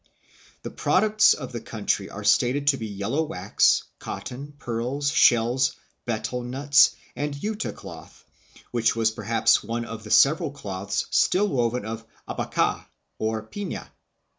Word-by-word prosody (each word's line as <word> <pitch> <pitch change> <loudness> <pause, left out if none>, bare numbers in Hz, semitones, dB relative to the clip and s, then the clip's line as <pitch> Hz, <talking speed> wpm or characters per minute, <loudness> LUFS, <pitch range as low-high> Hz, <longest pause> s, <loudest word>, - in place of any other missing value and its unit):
The - - -6
products 215 -1 +3
of 130 -4 -7
the 120 -2 -5
country 110 -2 -2
are - - -8
stated 135 +4 +2
to 135 - +3
be 110 -3 -5
yellow 105 +9 -2
wax, 100 - +2 0.2
cotton, 140 +4 -7
pearls, 130 +3 -2
shells, 120 -1 +3 0.3
betel 120 +2 -2
nuts, 140 +4 +4 0.2
and 145 0 -3
yuta 215 +9 -3
cloth, - - -12 0.5
which 115 -2 +1
was 110 -1 +2
perhaps 110 +1 +2
one 115 +1 -3
of 115 -2 -8
the 110 - -10
several 155 - +4
cloths 100 -8 -4
still 205 +3 +3
woven 120 - 0
of 115 0 -5 0.2
abaca, - - -1 0.3
or 110 0 -1
pifia. 205 - -6
125 Hz, 140 wpm, -25 LUFS, 110-145 Hz, 0.5 s, nuts